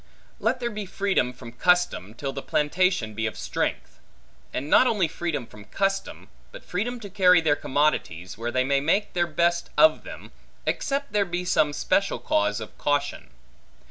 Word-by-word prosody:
Let 250 Hz, +3 st, 0 dB
there 240 Hz, -1 st, -2 dB
be 210 Hz, -2 st, -5 dB
freedom 190 Hz, -10 st, 0 dB
from 125 Hz, -1 st, -11 dB
custom, 145 Hz, -, +1 dB
till 135 Hz, +2 st, -4 dB
the 135 Hz, -, -5 dB
plantation 150 Hz, -, +1 dB
be 110 Hz, +1 st, -1 dB
of 110 Hz, -, -6 dB
strength; -, -, -3 dB, 0.5 s
and 140 Hz, -, -4 dB
not 255 Hz, -, +5 dB
only 200 Hz, -8 st, +2 dB
freedom 155 Hz, -5 st, -3 dB
from 105 Hz, -2 st, -14 dB
custom, 195 Hz, -, -2 dB, 0.2 s
but -, -, -11 dB
freedom 240 Hz, +7 st, -3 dB
to 205 Hz, -, -7 dB
carry 185 Hz, -2 st, +5 dB
their 155 Hz, -3 st, +2 dB
commodities, 100 Hz, -, -1 dB
where 115 Hz, +2 st, -4 dB
they 130 Hz, +1 st, +1 dB
may 140 Hz, +1 st, +2 dB
make 195 Hz, +8 st, +1 dB
their 175 Hz, -1 st, +1 dB
best 170 Hz, +2 st, 0 dB
of 315 Hz, -, +5 dB
them, -, -, -10 dB, 0.3 s
except 280 Hz, -2 st, -2 dB
there 205 Hz, -1 st, +3 dB
be 180 Hz, -1 st, -4 dB
some 155 Hz, -4 st, +2 dB
special 195 Hz, +6 st, 0 dB
cause 310 Hz, 0 st, 0 dB
of -, -, -9 dB
caution. 145 Hz, 0 st, -1 dB
170 Hz, 175 wpm, -25 LUFS, 135-195 Hz, 0.5 s, not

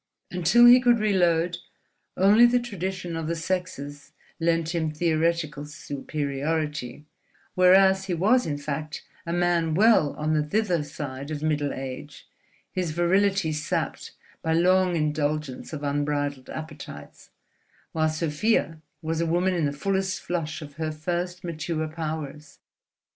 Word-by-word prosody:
Until 180 Hz, +7 st, +5 dB
he 245 Hz, +1 st, +9 dB
could 240 Hz, -1 st, +4 dB
reload, 175 Hz, -5 st, +2 dB, 0.6 s
only 210 Hz, +6 st, +6 dB
the 245 Hz, +1 st, +3 dB
tradition 185 Hz, -6 st, -4 dB
of 165 Hz, -1 st, -3 dB
the 170 Hz, -, -1 dB
sexes 160 Hz, -5 st, -4 dB, 0.3 s
lent 165 Hz, 0 st, +1 dB
him 160 Hz, -2 st, 0 dB
theoretical 155 Hz, -2 st, 0 dB
superiority; 150 Hz, -2 st, -3 dB, 0.5 s
whereas 190 Hz, +1 st, +5 dB
he 185 Hz, -2 st, -1 dB
was 215 Hz, +8 st, +3 dB
in 145 Hz, -2 st, -2 dB
fact 150 Hz, +1 st, -5 dB, 0.2 s
a -, -, -2 dB
man 170 Hz, -2 st, +1 dB
well 205 Hz, -7 st, +4 dB
on 155 Hz, +1 st, -1 dB
the 155 Hz, -, +2 dB
thither 180 Hz, +1 st, 0 dB
side 140 Hz, -1 st, -6 dB
of 155 Hz, -1 st, -4 dB
middle 150 Hz, -2 st, 0 dB
age, 135 Hz, +2 st, -7 dB, 0.4 s
his 180 Hz, -3 st, -2 dB
virility 185 Hz, 0 st, +2 dB
sapped 150 Hz, 0 st, -3 dB, 0.3 s
by 160 Hz, -, 0 dB
long 180 Hz, +1 st, +3 dB
indulgence 150 Hz, -3 st, -2 dB
of 150 Hz, -2 st, -6 dB
unbridled 145 Hz, -1 st, -1 dB
appetites; 150 Hz, -, -9 dB, 0.6 s
while 155 Hz, -1 st, +1 dB
Sofia 160 Hz, +2 st, 0 dB, 0.2 s
was 160 Hz, +1 st, -1 dB
a 170 Hz, -, 0 dB
woman 175 Hz, +3 st, +1 dB
in 170 Hz, -4 st, 0 dB
the -, -, -2 dB
fullest 190 Hz, +5 st, -1 dB
flush 160 Hz, -2 st, -3 dB
of 145 Hz, -1 st, -12 dB
her 160 Hz, -1 st, -2 dB
first 175 Hz, +4 st, -3 dB
mature 160 Hz, -1 st, -3 dB
powers. 155 Hz, -2 st, -6 dB
160 Hz, 135 wpm, -25 LUFS, 150-180 Hz, 0.6 s, he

